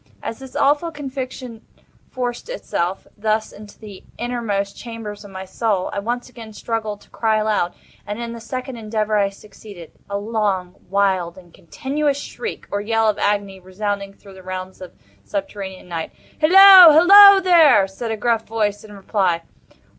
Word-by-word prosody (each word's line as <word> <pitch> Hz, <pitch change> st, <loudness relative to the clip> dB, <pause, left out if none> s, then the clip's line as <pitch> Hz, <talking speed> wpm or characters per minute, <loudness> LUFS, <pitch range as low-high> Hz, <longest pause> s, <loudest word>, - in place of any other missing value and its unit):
As 225 Hz, -, -6 dB
this 265 Hz, -1 st, -12 dB
awful 295 Hz, +4 st, +1 dB
conviction 260 Hz, -5 st, -7 dB, 0.5 s
forced 245 Hz, -, -5 dB
itself, 190 Hz, -, -3 dB
thus, 215 Hz, +1 st, -1 dB
into 205 Hz, 0 st, -14 dB
the 205 Hz, -3 st, -12 dB
innermost 225 Hz, -5 st, -3 dB
chambers 225 Hz, -3 st, -8 dB
of 205 Hz, -, -12 dB
my 190 Hz, 0 st, -8 dB
soul, 200 Hz, -1 st, -2 dB
I -, -, -2 dB
once 240 Hz, +4 st, -4 dB
again 230 Hz, -3 st, -12 dB
struggled 215 Hz, -2 st, -4 dB
to -, -, -21 dB
cry 220 Hz, -1 st, 0 dB
aloud. 215 Hz, -5 st, -1 dB, 0.3 s
And 205 Hz, +2 st, -5 dB
in 235 Hz, -1 st, -5 dB
this 230 Hz, 0 st, -11 dB
second 255 Hz, -1 st, -5 dB
endeavor 215 Hz, -1 st, -2 dB
I 200 Hz, -1 st, +2 dB
succeeded. 200 Hz, -3 st, -14 dB, 0.2 s
A 200 Hz, -, -2 dB
long, 200 Hz, -4 st, -2 dB, 0.2 s
wild, 190 Hz, -3 st, 0 dB
and 175 Hz, -2 st, -16 dB
continuous 280 Hz, -, -3 dB
shriek, 455 Hz, +9 st, -7 dB
or 200 Hz, -, -2 dB
yell 225 Hz, +1 st, 0 dB
of 215 Hz, -, 0 dB
agony, 200 Hz, -2 st, -1 dB
resounded 200 Hz, +1 st, -5 dB
through 195 Hz, -, -15 dB
the 190 Hz, -, -13 dB
realms 185 Hz, 0 st, -7 dB
of 185 Hz, -, -11 dB
the 100 Hz, 0 st, -32 dB
subterranean 195 Hz, -2 st, -6 dB
Night. 165 Hz, -2 st, -5 dB, 0.3 s
"Hillo! 370 Hz, +1 st, +9 dB
hillo, 395 Hz, +5 st, +9 dB
there!" 330 Hz, -, +5 dB
said 210 Hz, +5 st, -7 dB
a 220 Hz, -, -3 dB
gruff 225 Hz, +1 st, -1 dB
voice, 210 Hz, -2 st, -2 dB
in 210 Hz, -1 st, -13 dB
reply. 190 Hz, -4 st, -1 dB
215 Hz, 165 wpm, -20 LUFS, 195-245 Hz, 0.5 s, Hillo